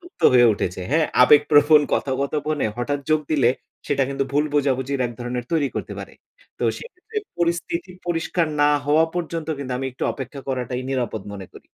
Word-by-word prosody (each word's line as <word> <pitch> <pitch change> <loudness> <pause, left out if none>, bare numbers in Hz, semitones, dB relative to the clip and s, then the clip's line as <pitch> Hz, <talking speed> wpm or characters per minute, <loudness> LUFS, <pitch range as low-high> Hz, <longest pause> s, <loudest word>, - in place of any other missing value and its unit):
জুক্ত 350 +2 -16
হয়ে 120 -1 +7
উঠেছে, 90 -1 -3
হ্যাঁ? 155 +1 +3 0.2
আবেগ 145 +3 +7
প্রবণ 150 0 +6
কথা-কথপনে 140 +1 -1
হঠাৎ 145 +4 -2
যোগ 155 0 +4
দিলে, 135 -6 +4 0.4
সেটা 140 -1 +1
কিন্তু 135 0 -1
ভুল 145 +1 +2
বোঝাবুঝির 135 -1 0
১ 120 - -7
ধরনের 120 0 -3
তৈরি 150 -4 +2
করতে - - -4
পারে। - - -8 0.5
তো - - -1
সেক্ষেত্রে 440 -1 -12 0.2
পরিস্থিতি 170 +1 -1 0.2
পরিষ্কার 165 0 0
না 145 0 +5 0.2
হওয়া 155 +2 +4
পর্যন্ত 165 -2 -3
কিন্তু, 135 -2 -4
আমি 135 - -2
একটু - - -4
অপেক্ষা 135 +1 -7
করাটাই 125 -1 -2
নিরাপদ 120 -5 -2
মনে 95 -2 -8
করি। - - -15
145 Hz, 175 wpm, -22 LUFS, 130-160 Hz, 0.5 s, হয়ে